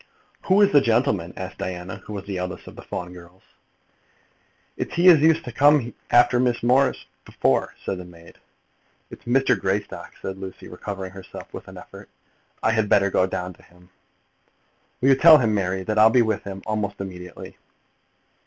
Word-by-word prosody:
"Who 190 +2 +3
is 200 - +5
the 145 - +6
gentleman?" 115 -8 0
asked 95 0 -7
Diana, 90 +2 -5
who 105 - -11
was 100 -2 -6
the 100 -2 -4
eldest 90 0 -6
of - - -12
the - - -10
Fawn 90 0 -7
girls 90 +1 -15
present. - - -39 0.2
"It's - - -9
he 175 +2 +6
as 165 -4 +7
used 160 +1 +3
to 125 - -6
come 140 -1 +3 0.2
after 120 0 +4
Miss 120 -2 0
Morris 130 +3 +2 0.2
before," 65 0 -1
said 95 - -3
the - - -7
maid. 85 -1 -16 0.7
"It - - -10
is - - -29
Mr. 125 -2 +2
Greystock," 95 +2 -3
said 95 0 -6
Lucy, 95 -1 -9
recovering 95 +1 -7
herself 95 0 -11
with - - -9
an - - -12
effort. - - -13 0.5
"I 110 - +3
had 110 -2 0
better 100 -1 +3
go 95 - +2
down 90 0 -5
to - - -22
him. 90 +1 -23 1.1
Will 130 - +3
you 135 - +6
tell 155 +3 +8
him, 115 -6 +1
Mary, 95 -2 -1
that 110 +2 -1
I'll 110 +1 +7
be 120 +1 +4
with 110 -2 -2
him 95 -1 -8
almost 105 -2 -3
immediately?" 90 -2 -9
100 Hz, 190 wpm, -23 LUFS, 95-125 Hz, 1.1 s, tell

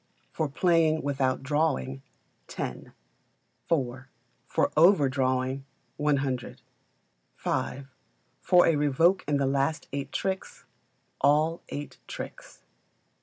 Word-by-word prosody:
For 155 -2 -1
playing 160 0 +2
without 135 -2 0
drawing, 130 - 0 0.5
10; - - -6 0.8
iv. 130 -5 0 0.4
For - - +1
overdrawing, 135 -6 +3 0.3
100; 140 -4 -1 0.8
v. 140 - -2 0.6
For 180 -1 +5
a 165 - +3
revoke 155 +6 +3
in 145 -1 +2
the 140 - +1
last 140 +3 0
eight 140 -1 -4
tricks, 190 -1 -3 0.6
all 155 +3 +3
the - - -6
eight 145 - -8
tricks. - - -9
145 Hz, 100 wpm, -28 LUFS, 135-160 Hz, 0.8 s, For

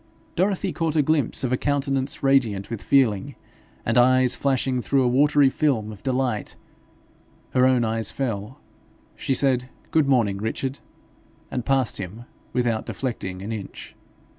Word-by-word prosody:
Dorothy 190 0 0
caught 165 -2 -1
a 150 - +4
glimpse 145 -4 +1
of 130 -1 0
a - - +2
countenance 140 -1 -1
radiant 120 -8 +2
with 115 - -4
feeling, 115 -8 +2 0.5
and 115 +2 +3
eyes 130 0 +4
flashing 130 -2 0
through 135 +2 +2
a - - +2
watery 145 +3 +4
film 130 -6 0
of 105 - -11
delight; 130 -5 -1 1.0
her 130 0 +4
own 125 -2 +3
eyes 115 0 0
fell; 120 0 -4 0.6
she 135 - -1
said, 125 -2 +1 0.2
'Good 155 -3 +3
morning, 115 -8 +2
Richard!' 130 +5 -3 0.7
and 125 -3 -4
passed 135 -4 +1
him 100 +5 -7 0.3
without 120 -3 -1
deflecting 95 -8 -4
an 105 - -5
inch. 105 -3 -7
130 Hz, 145 wpm, -24 LUFS, 115-135 Hz, 1.0 s, a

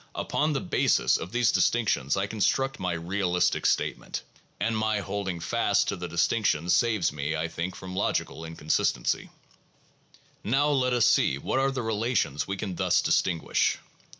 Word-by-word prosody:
Upon 150 +1 0
the 135 - -1
basis - - +2
of 90 - -7
these 120 -1 +2
dis - - +4
tinctions 100 - 0
I 95 - +1
construct 135 +6 0
my 90 -1 -1
realistic 90 +1 0
statement; - - -1 0.4
and 115 +1 0
my 110 -1 0
holding 100 -3 -4
fast 85 - +1
to - - -1
the 90 0 -6
distinctions 85 -1 +1
saves 105 -1 +2
me, 75 +2 -2
I 80 +1 -1
think, 85 +3 -4
from 95 -1 -8
logical 90 -4 -1
inconsistency. 80 -1 -1 1.1
Now 135 +7 +2
let 130 -3 +1
us 120 -2 +3
see 65 - +3
what 130 - -1
are 135 +1 +2
the 130 -2 -3
relations 110 - -1
we 100 0 -3
can 95 -4 -5
thus - - +2
distinguish. 85 -3 +1
100 Hz, 160 wpm, -27 LUFS, 85-115 Hz, 1.1 s, dis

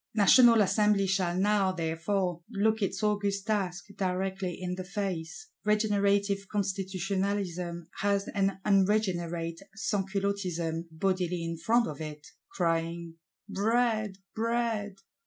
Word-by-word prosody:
National 230 +2 +7
Assembly 210 0 +3
shall 185 -2 0
now, 200 0 +3
therefore, 175 +1 -1
look 220 0 +1
its 200 +2 -1
august 205 -2 0
task 185 -5 -1
directly 190 -1 -2
in 180 -1 -3
the 185 0 -4
face: 190 - -4 0.2
regenerative 200 -2 +2
Constitutionalism 190 -3 -2
has 200 0 +1
an 195 -1 0
unregenerate 180 -5 +1 0.2
Sansculottism 190 -5 -1
bodily 180 +1 -1
in 165 0 -3
front 230 +9 +2
of 150 -1 -6
it; 150 -1 -7 0.2
crying, 165 -1 -1 0.3
'Bread! 215 -1 +1 0.2
Bread! 225 -3 -1
195 Hz, 105 wpm, -29 LUFS, 175-205 Hz, 0.3 s, National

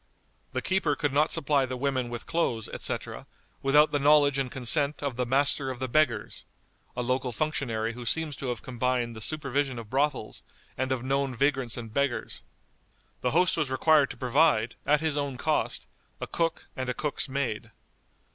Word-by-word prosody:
The - - -2
keeper 185 -6 +1
could 145 -2 -1
not 150 +2 +3
supply 140 -2 +2
the 130 0 -4
women 130 -2 -1
with 120 -1 -5
clothes, 120 -10 -1
etc., - - -4 0.3
without 150 +3 +5
the 145 - +1
knowledge 145 -1 +5
and 135 -2 -1
consent 140 +3 +1
of 140 -3 -2
the 125 0 -1
Master 135 +1 +2
of 130 - -4
the 130 +1 -3
Beggars 125 -4 0 0.5
(a 125 - 0
local 130 +1 -1
functionary 115 -4 -2
who 120 +1 -8
seems 160 0 +1
to 135 - -5
have 120 -2 -3
combined 125 -1 -1
the 110 - -8
supervision 140 -1 0
of 115 -2 -8
brothels, 135 -5 -1 0.3
and 130 0 -2
of 130 -2 -1
known 135 0 0
vagrants 135 -2 +1
and 115 -2 -7
beggars). 140 -2 -1 0.8
The 125 - +1
host 180 +6 +3
was 150 -4 0
required 145 +2 +4
to - - -8
provide, 125 -3 +3
at 150 +1 +4
his 155 -2 0
own 140 -3 -2
cost, - - 0 0.3
a - - -3
cook 165 -1 -1
and 130 -1 -3
a 125 - -1
cook's 150 -2 -2
maid. 130 -6 -2
135 Hz, 180 wpm, -28 LUFS, 125-145 Hz, 0.8 s, without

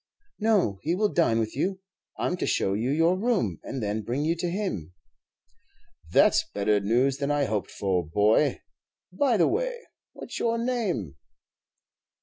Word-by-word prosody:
"No, 205 - +2
he 165 +3 0
will 210 +2 +1
dine 140 -10 +3
with 110 -1 -2
you. 185 +7 -1 0.4
I - - -2
'm 180 - 0
to - - -2
show 95 - +1
you 110 +5 -1
your 165 +5 +3
room, 190 - 0
and 130 -4 -5
then 105 +1 -1
bring 125 +7 -2
you 165 +2 +1
to 175 +1 -2
him." 170 - -4 1.2
"That - - +5
's - - +3
better 105 +1 +2
news 125 +7 +1
than 140 0 -2
I 145 -1 +2
hoped 105 -4 -2
for, 95 -3 -1
boy. 105 +7 +2 0.5
By 245 +2 +2
the 175 - +4
way, - - -1 0.4
what's - - -7
your 230 0 +1
name?" 225 - -2
140 Hz, 165 wpm, -26 LUFS, -, 1.2 s, That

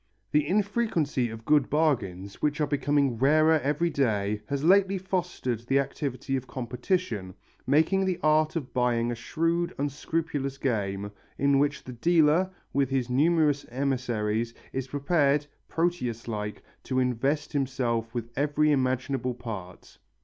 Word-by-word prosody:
The 150 -1 +2
infrequency 185 - 0
of 115 0 -9
good 150 -2 +3
bargains, 105 - 0
which 150 +1 0
are 150 - +3
becoming 140 -3 +1
rarer 155 +4 +4
every 150 +5 0
day, 105 -7 0
has 140 0 -2
lately 195 +3 +4
fostered 180 - -2
the 135 - +3
activity 135 -1 -2
of 130 -1 -3
competition, 120 - -2 0.3
making 160 +6 +3
the 185 -2 0
art 155 +1 +3
of 145 -6 -4
buying 120 -1 +1
a - - -2
shrewd, 165 +8 -1
unscrupulous 145 0 -2
game, 100 -6 -2 0.3
in 140 0 +3
which 145 +1 0
the 125 - -8
dealer, 165 +6 +3 0.2
with 135 -1 +2
his 130 -2 -1
numerous 150 +1 +3
emissaries, 120 -4 -1 0.2
is 130 -1 -3
prepared, 145 +1 +1 0.2
Proteus 125 -10 -1
like, 105 -2 -4 0.2
to 130 - -2
invest 135 +5 0
himself 125 -5 -1
with 120 -1 -5
every 150 +2 +2
imaginable 130 -2 0
part. 105 -7 -8
140 Hz, 135 wpm, -27 LUFS, 120-155 Hz, 0.3 s, rarer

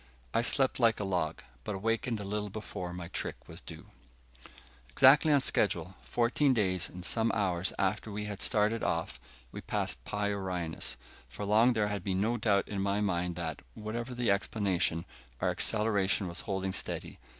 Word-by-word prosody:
I 115 - +3
slept 130 +2 +2
like 115 -2 +4
a - - -1
log, 90 -5 -1 0.2
but 105 - -3
awakened 115 +3 -1
a - - -5
little 105 +1 -3
before 95 -3 -6
my 90 -1 -6
trick - - -5
was - - -8
due. - - -11 1.0
Exactly 140 - +6
on 140 -2 +5
schedule, 90 -7 +1
fourteen 130 +3 +2
days 95 -5 +1
and 90 0 -8
some 115 +2 +1
hours 95 -4 +1
after 100 +3 0
we 105 +1 -4
had 105 -2 -5
started 110 +2 +2
off, 85 -5 -1 0.3
we - - -7
passed - - -2
Pi 105 0 -1
Orionis. 90 -5 -2 0.3
For 105 - -6
long 110 +5 +5
there 105 -2 +1
had 100 -3 -3
been 95 -1 0
no 110 +4 +1
doubt 105 -3 +2
in 100 -2 -3
my 100 +1 +1
mind 90 -4 0
that, 80 -4 -4 0.2
whatever 115 +4 -5
the 120 -3 +2
explanation, 95 -4 0 0.3
our - - +1
acceleration 105 -3 +1
was 85 +1 -5
holding 95 -2 -2
steady. - - -4
100 Hz, 170 wpm, -31 LUFS, 95-110 Hz, 1.0 s, Exactly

